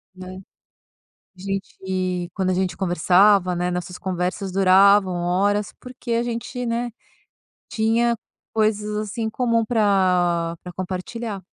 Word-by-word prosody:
Né. 185 Hz, 0 st, -9 dB, 1.0 s
A -, -, -16 dB
gente 190 Hz, -2 st, -3 dB
quando 190 Hz, -2 st, 0 dB
a -, -, +1 dB
gente 185 Hz, -1 st, -1 dB
conversava, 185 Hz, +1 st, +3 dB
né, 175 Hz, +1 st, -1 dB
nossas 180 Hz, 0 st, -4 dB
conversas 185 Hz, +1 st, -3 dB
duravam 195 Hz, 0 st, +5 dB
horas 195 Hz, +4 st, 0 dB
porque 250 Hz, -1 st, -7 dB
a 230 Hz, -, +1 dB
gente, 240 Hz, +1 st, -4 dB
né, 235 Hz, +1 st, -1 dB, 0.8 s
tinha 235 Hz, +1 st, +1 dB, 0.4 s
coisas, 210 Hz, -1 st, 0 dB
assim, 215 Hz, +2 st, -4 dB
em 220 Hz, -, -1 dB
comum 230 Hz, -1 st, +1 dB
pra 180 Hz, -6 st, +2 dB
pra 180 Hz, -, -8 dB
compartilhar. 190 Hz, +3 st, -5 dB
195 Hz, 125 wpm, -22 LUFS, 180-220 Hz, 1.0 s, duravam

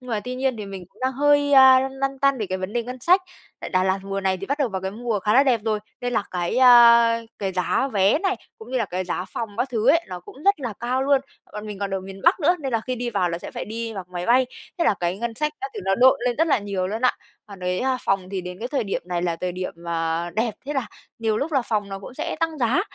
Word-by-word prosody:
Nhưng 250 Hz, -1 st, -10 dB
mà 215 Hz, -2 st, 0 dB
tuy 250 Hz, +5 st, -5 dB
nhiên 260 Hz, -1 st, -1 dB
thì 210 Hz, -2 st, -6 dB
mình 195 Hz, -2 st, -8 dB
cũng -, -, -26 dB
đang 260 Hz, +1 st, 0 dB
hơi, 290 Hz, +1 st, +3 dB
a, 265 Hz, -1 st, +8 dB
lăn 265 Hz, 0 st, -3 dB
lăn 270 Hz, 0 st, -3 dB
tăn 275 Hz, -1 st, +2 dB
về 215 Hz, -, -2 dB
cái 185 Hz, 0 st, -3 dB
vấn 185 Hz, +2 st, -5 dB
đề 240 Hz, 0 st, 0 dB
ngân 250 Hz, +2 st, -7 dB
sách. 360 Hz, +9 st, +4 dB, 0.4 s
Tại -, -, -6 dB
Đà 185 Hz, 0 st, +2 dB
Lạt 190 Hz, +1 st, +1 dB
mùa 195 Hz, 0 st, -3 dB
này 190 Hz, -1 st, +1 dB
thì 195 Hz, +2 st, -7 dB
bắt 280 Hz, +2 st, -1 dB
đầu 280 Hz, -4 st, +1 dB
vào 190 Hz, -3 st, -4 dB
cái 190 Hz, -, -2 dB
mùa 225 Hz, +1 st, -2 dB
khá 210 Hz, +2 st, +1 dB
là 270 Hz, -, +7 dB
đẹp 250 Hz, -5 st, +2 dB
rồi, 215 Hz, -1 st, 0 dB, 0.2 s
nên 245 Hz, 0 st, -2 dB
là 225 Hz, -, +1 dB
cái, 175 Hz, +4 st, -2 dB
a, 235 Hz, -2 st, +7 dB, 0.2 s
cái 195 Hz, -2 st, -2 dB
giá 185 Hz, +9 st, 0 dB
vé 200 Hz, +7 st, +3 dB
này, 385 Hz, +2 st, 0 dB, 0.2 s
cũng 445 Hz, -, -12 dB
như 260 Hz, -, 0 dB
là 230 Hz, -, +1 dB
cái 185 Hz, -1 st, -3 dB
giá 180 Hz, 0 st, -3 dB
phòng 225 Hz, +4 st, -5 dB
các 260 Hz, -, 0 dB
thứ 230 Hz, 0 st, 0 dB
ấy, 330 Hz, +3 st, +4 dB
nó 180 Hz, -1 st, -6 dB
cũng 175 Hz, -, -14 dB
rất 400 Hz, -4 st, +3 dB
là 240 Hz, -5 st, -3 dB
cao 250 Hz, +2 st, 0 dB
luôn. 275 Hz, 0 st, +3 dB, 0.3 s
Bọn 210 Hz, +1 st, -7 dB
mình 210 Hz, -2 st, -7 dB
còn 200 Hz, 0 st, -3 dB
ở 190 Hz, -, -2 dB
miền 195 Hz, +1 st, -10 dB
Bắc -, -, +4 dB
nữa 345 Hz, +4 st, +3 dB
nên 270 Hz, -3 st, -4 dB
là 230 Hz, -, +1 dB
khi 255 Hz, -, -1 dB
đi 245 Hz, 0 st, -3 dB
vào 190 Hz, -5 st, +1 dB
là 170 Hz, -, -3 dB
sẽ -, -, -8 dB
phải -, -, -5 dB
đi 225 Hz, +1 st, -5 dB
bằng 190 Hz, -2 st, -5 dB
máy 175 Hz, 0 st, -4 dB
bay, 255 Hz, +2 st, +4 dB, 0.3 s
thế 340 Hz, -, +2 dB
là -, -, +4 dB
cái 175 Hz, +2 st, -1 dB
ngân 235 Hz, 0 st, -3 dB
sách 300 Hz, +3 st, -1 dB
đó, 405 Hz, -, -3 dB
thì 425 Hz, -, -5 dB
nó 195 Hz, -, +2 dB
độn 255 Hz, +4 st, +5 dB
lên 245 Hz, -1 st, 0 dB
rất 325 Hz, -, +2 dB
là 290 Hz, -, +3 dB
nhiều 200 Hz, -3 st, -2 dB
luôn 220 Hz, +4 st, -4 dB
á. 250 Hz, -, +4 dB, 0.3 s
Còn 200 Hz, -3 st, -12 dB
cái 180 Hz, +2 st, -1 dB, 0.2 s
phòng 195 Hz, -2 st, 0 dB
thì 195 Hz, -2 st, -2 dB
đến 180 Hz, 0 st, -8 dB
cái 235 Hz, +3 st, -4 dB
thời 260 Hz, -4 st, -1 dB
điểm 195 Hz, -, -3 dB
này 175 Hz, -1 st, -2 dB
là 170 Hz, -2 st, -1 dB
thời 180 Hz, +1 st, -3 dB
điểm, 175 Hz, -2 st, -6 dB
à, 165 Hz, +1 st, -1 dB
đẹp, 220 Hz, +3 st, -1 dB
thế 290 Hz, -, -2 dB
là 270 Hz, -5 st, -1 dB, 0.3 s
nhiều 220 Hz, -2 st, 0 dB
lúc 310 Hz, +6 st, -3 dB
là 270 Hz, -3 st, +2 dB
phòng 210 Hz, -3 st, -2 dB
nó 195 Hz, 0 st, -5 dB
cũng 200 Hz, +6 st, -11 dB
sẽ 310 Hz, -, -4 dB
tăng 325 Hz, -2 st, -1 dB
giá 250 Hz, +6 st, +2 dB
230 Hz, 305 wpm, -23 LUFS, 190-260 Hz, 0.4 s, a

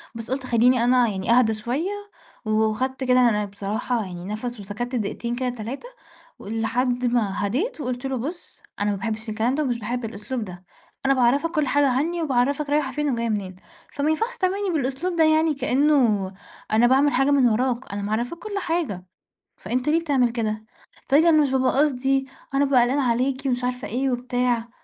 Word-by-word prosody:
بس 230 Hz, +2 st, -6 dB
قُلت 260 Hz, -1 st, -2 dB
خلّيني 245 Hz, 0 st, +3 dB
أنا 245 Hz, 0 st, +4 dB
يعني 195 Hz, +1 st, -2 dB
أهدى 235 Hz, -2 st, +4 dB
شويّة 245 Hz, -, -2 dB, 0.5 s
و -, -, -4 dB
وخدت 220 Hz, +5 st, 0 dB
كده 255 Hz, -1 st, +4 dB
أنا 210 Hz, -2 st, 0 dB
بصراحة 205 Hz, +3 st, -3 dB
يعني 175 Hz, -1 st, -8 dB
نفَس 220 Hz, +4 st, -5 dB
وسكتّ 215 Hz, +6 st, -5 dB
دقيقتين 235 Hz, +2 st, -2 dB
كده، 255 Hz, 0 st, -1 dB
3 245 Hz, -, -6 dB, 0.5 s
ولحد 240 Hz, +4 st, -1 dB
ما 210 Hz, -4 st, 0 dB
هدِيت 305 Hz, -, -2 dB
وقُلت 250 Hz, 0 st, -4 dB
له: 265 Hz, -1 st, -1 dB
"بُص، 320 Hz, +9 st, -7 dB, 0.2 s
أنا 205 Hz, 0 st, +1 dB
ما 200 Hz, -, -2 dB
باحبش 220 Hz, +2 st, -4 dB
الكلام 225 Hz, +4 st, 0 dB
ده 305 Hz, -, 0 dB
ومش 245 Hz, -4 st, -1 dB
باحب 235 Hz, +2 st, -3 dB
الأسلوب 220 Hz, +3 st, -4 dB
ده، 180 Hz, -1 st, -10 dB, 0.4 s
أنا 275 Hz, -, +4 dB
باعرّفك 270 Hz, +6 st, +2 dB
كل 305 Hz, -4 st, 0 dB
حاجة 285 Hz, +1 st, +3 dB
عني 320 Hz, +7 st, 0 dB
وباعرّفك 280 Hz, 0 st, 0 dB
رايحة 290 Hz, -2 st, +1 dB
فين 295 Hz, +3 st, -1 dB
وجاية 235 Hz, -1 st, -1 dB
منين، 195 Hz, -4 st, -3 dB, 0.4 s
فما 290 Hz, +1 st, 0 dB
ينفعش 450 Hz, +10 st, -1 dB
تعاملني 390 Hz, 0 st, 0 dB
بالأسلوب 300 Hz, +5 st, -1 dB
ده 330 Hz, -, +4 dB
يعني 315 Hz, 0 st, +3 dB
كأنه 255 Hz, -8 st, +2 dB, 0.4 s
أنا 225 Hz, +3 st, +5 dB
باعمل 275 Hz, +3 st, +4 dB
حاجة 270 Hz, +3 st, +3 dB
من 265 Hz, -4 st, +5 dB
وراك، 245 Hz, +1 st, -1 dB
أنا 200 Hz, -, -3 dB
معرّفاك 230 Hz, +10 st, -2 dB
كُل 410 Hz, +2 st, -5 dB
حاجة 325 Hz, -, -2 dB, 0.5 s
فأنت 255 Hz, +4 st, -2 dB
ليه 320 Hz, +2 st, +3 dB
بتعمل 280 Hz, -7 st, +2 dB
كده؟" 220 Hz, -2 st, -3 dB, 0.4 s
فقال 285 Hz, +3 st, +6 dB
لي: 335 Hz, -, +4 dB
"أنا 310 Hz, -2 st, +5 dB
مش 285 Hz, -, +2 dB
بابقى 260 Hz, -1 st, +2 dB
قصدي، 270 Hz, -1 st, +1 dB, 0.3 s
أنا 275 Hz, +1 st, +3 dB
بابقى 270 Hz, -3 st, +4 dB
قلقان 260 Hz, +4 st, +1 dB
عليكِ" 255 Hz, +1 st, +1 dB
ومش 250 Hz, -1 st, 0 dB
عارفة 250 Hz, 0 st, -2 dB
إيه 260 Hz, +4 st, -1 dB
وبتاع. 245 Hz, -1 st, -1 dB
250 Hz, 185 wpm, -23 LUFS, 225-280 Hz, 0.5 s, فقال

